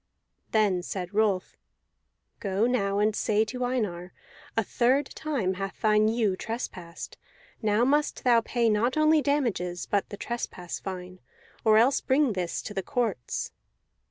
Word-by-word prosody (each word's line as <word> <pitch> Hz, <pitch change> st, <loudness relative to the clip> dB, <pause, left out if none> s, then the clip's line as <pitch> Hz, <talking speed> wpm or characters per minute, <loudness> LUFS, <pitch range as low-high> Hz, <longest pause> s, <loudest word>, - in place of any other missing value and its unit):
Then 205 Hz, -5 st, +2 dB
said 180 Hz, +1 st, -5 dB
Rolf, 205 Hz, -3 st, +1 dB, 0.8 s
"Go 200 Hz, +1 st, 0 dB
now 200 Hz, -5 st, +1 dB
and 210 Hz, +1 st, +2 dB
say 215 Hz, 0 st, +2 dB
to 250 Hz, +3 st, -4 dB
Einar: 205 Hz, -8 st, -2 dB, 0.4 s
'A 225 Hz, -, +3 dB
third 255 Hz, +7 st, +2 dB
time 260 Hz, -12 st, -1 dB
hath 195 Hz, +1 st, -5 dB
thine 215 Hz, 0 st, +4 dB
ewe 220 Hz, -4 st, +1 dB
trespassed; 185 Hz, -6 st, -6 dB, 0.4 s
now 215 Hz, +1 st, +2 dB
must 295 Hz, +3 st, +1 dB
thou 240 Hz, -2 st, +5 dB
pay 235 Hz, 0 st, 0 dB
not 225 Hz, +5 st, +2 dB
only 310 Hz, 0 st, +5 dB
damages, 235 Hz, -12 st, 0 dB
but 200 Hz, -1 st, 0 dB
the 205 Hz, -, -7 dB
trespass 200 Hz, -6 st, -5 dB
fine, 185 Hz, -1 st, -7 dB, 0.4 s
or 215 Hz, -1 st, +5 dB
else 250 Hz, +5 st, +4 dB
bring 265 Hz, -2 st, +2 dB
this 180 Hz, -3 st, -3 dB
to 210 Hz, -, -6 dB
the 195 Hz, -, -1 dB
courts.'" 225 Hz, -, -2 dB
215 Hz, 145 wpm, -27 LUFS, 190-245 Hz, 0.8 s, thou